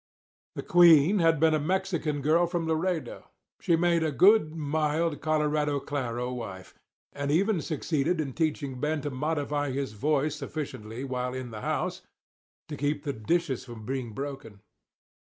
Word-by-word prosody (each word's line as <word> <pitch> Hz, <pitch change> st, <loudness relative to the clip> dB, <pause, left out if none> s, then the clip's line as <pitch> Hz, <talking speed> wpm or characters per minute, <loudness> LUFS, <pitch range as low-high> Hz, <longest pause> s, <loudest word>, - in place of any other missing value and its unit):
The -, -, -5 dB
queen 175 Hz, +2 st, +6 dB
had 165 Hz, -3 st, +3 dB
been 160 Hz, 0 st, +4 dB
a 155 Hz, -, +2 dB
Mexican 165 Hz, -3 st, -1 dB
girl 165 Hz, +4 st, +3 dB
from 170 Hz, -1 st, -2 dB
Laredo. 160 Hz, +1 st, -2 dB, 0.3 s
She 170 Hz, -, +2 dB
made 170 Hz, 0 st, +2 dB
a 160 Hz, -1 st, 0 dB
good, 165 Hz, -, +5 dB
mild, 155 Hz, 0 st, -1 dB
Colorado 150 Hz, -2 st, +1 dB
claro 125 Hz, -3 st, -3 dB
wife, 100 Hz, -7 st, -7 dB, 0.4 s
and 140 Hz, 0 st, -3 dB
even 185 Hz, +4 st, +2 dB
succeeded 155 Hz, +2 st, -1 dB
in 140 Hz, -4 st, -2 dB
teaching 145 Hz, -4 st, -2 dB
Ben 150 Hz, +2 st, -1 dB
to 145 Hz, -, -4 dB
modify 145 Hz, +1 st, -1 dB
his 135 Hz, -4 st, -3 dB
voice 145 Hz, +6 st, 0 dB
sufficiently 135 Hz, -5 st, -6 dB
while 125 Hz, -1 st, -3 dB
in 130 Hz, -2 st, -6 dB
the 105 Hz, -1 st, -7 dB
house -, -, -2 dB, 0.7 s
to 150 Hz, -, -5 dB
keep 145 Hz, +1 st, -1 dB
the 140 Hz, -, -2 dB
dishes 135 Hz, +4 st, -1 dB
from 120 Hz, -3 st, -10 dB
being 130 Hz, -3 st, -4 dB
broken. 135 Hz, -6 st, -7 dB
150 Hz, 155 wpm, -28 LUFS, 135-160 Hz, 0.7 s, queen